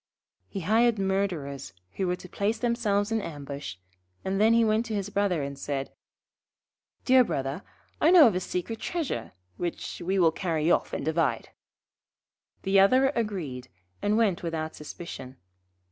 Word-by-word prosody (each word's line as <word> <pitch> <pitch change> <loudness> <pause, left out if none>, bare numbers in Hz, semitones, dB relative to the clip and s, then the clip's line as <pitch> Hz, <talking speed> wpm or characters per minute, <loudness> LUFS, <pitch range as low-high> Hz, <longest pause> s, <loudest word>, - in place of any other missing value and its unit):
He 195 - -4
hired 225 +5 +3
Murderers, 175 - -2 0.2
who 190 - -2
were 180 - +1
to 180 - -12
place 205 +4 -1
themselves 220 -3 0
in 225 -1 +1
ambush, 140 - -6 0.5
and 195 +1 0
then 220 +1 +6
he 230 0 +5
went 215 +1 +2
to 220 - -3
his 200 0 -3
Brother, 195 -6 +1
and 140 0 -6
said: 140 -1 -3 1.1
'Dear 260 0 +6
Brother, 135 - -3 0.4
I 315 - +6
know 350 -4 +9
of 225 - +4
a 180 - 0
secret 185 +5 -4
treasure 290 - -3 0.2
which 175 0 -4
we 190 +3 0
will 170 -3 +5
carry 165 -2 0
off - - +2
and - - -3
divide.' 155 -7 0 1.1
The 195 0 +4
other 255 +7 +5
agreed, 185 - -3 0.3
and 210 +1 +2
went 210 -6 +2
without 160 -2 -3
suspicion. 135 -4 -8
190 Hz, 155 wpm, -27 LUFS, 155-220 Hz, 1.1 s, know